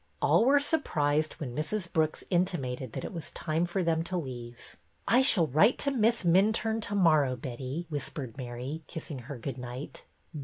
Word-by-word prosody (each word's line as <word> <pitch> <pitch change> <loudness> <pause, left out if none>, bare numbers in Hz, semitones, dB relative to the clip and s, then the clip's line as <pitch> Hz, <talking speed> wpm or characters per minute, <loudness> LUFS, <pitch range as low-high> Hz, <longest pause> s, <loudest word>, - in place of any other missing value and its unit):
All 170 +10 +4
were 280 +2 +6
surprised 155 - +1
when 130 -7 -6
Mrs. 170 +5 -2
Brooks 155 -1 +1
intimated 140 -8 -1
that - - -4
it - - -6
was 165 -3 -5
time 165 +2 -1
for 185 +2 -1
them 165 -1 +1
to 185 +1 -2
leave. 120 -6 -7 0.3
I 245 +3 +5
shall 210 - +5
write 160 - +4
to 280 - +1
Miss 230 -3 +2
Minturne 215 +5 +3
to 205 - -3
morrow, 155 -8 +4
Betty," 130 +5 -5
whispered 140 -5 -5
Mary, 125 +4 -5
kissing 155 -4 -7
her 125 +3 -8
good 125 +2 -5
night. 125 +3 -7
155 Hz, 175 wpm, -29 LUFS, 130-190 Hz, 0.3 s, were